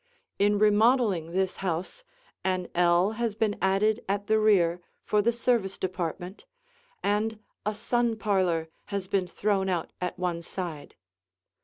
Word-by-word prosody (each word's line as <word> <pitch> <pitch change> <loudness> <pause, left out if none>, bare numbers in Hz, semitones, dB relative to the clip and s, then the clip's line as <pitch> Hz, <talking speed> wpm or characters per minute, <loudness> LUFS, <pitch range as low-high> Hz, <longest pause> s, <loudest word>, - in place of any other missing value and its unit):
In 205 +1 +3
remodeling 210 -4 +3
this 185 +2 -1
house, 185 - -3 0.4
an 185 -1 -1
ell 175 +3 +3
has 230 -3 0
been 215 -2 0
added 210 +4 +2
at 200 +1 -1
the 220 +1 +3
rear 180 -5 +3 0.2
for 210 - +2
the 235 +3 +3
service 235 -5 0
department, 180 +1 -4 0.6
and 210 +2 0 0.3
a 210 - 0
sun 235 +1 0
parlor 185 -7 +1 0.2
has 200 -2 -4
been 190 -2 0
thrown 195 +1 0
out 175 -3 -2
at 180 +1 -3
one 180 -2 -2
side. 170 -4 -6
195 Hz, 140 wpm, -27 LUFS, 180-215 Hz, 0.6 s, In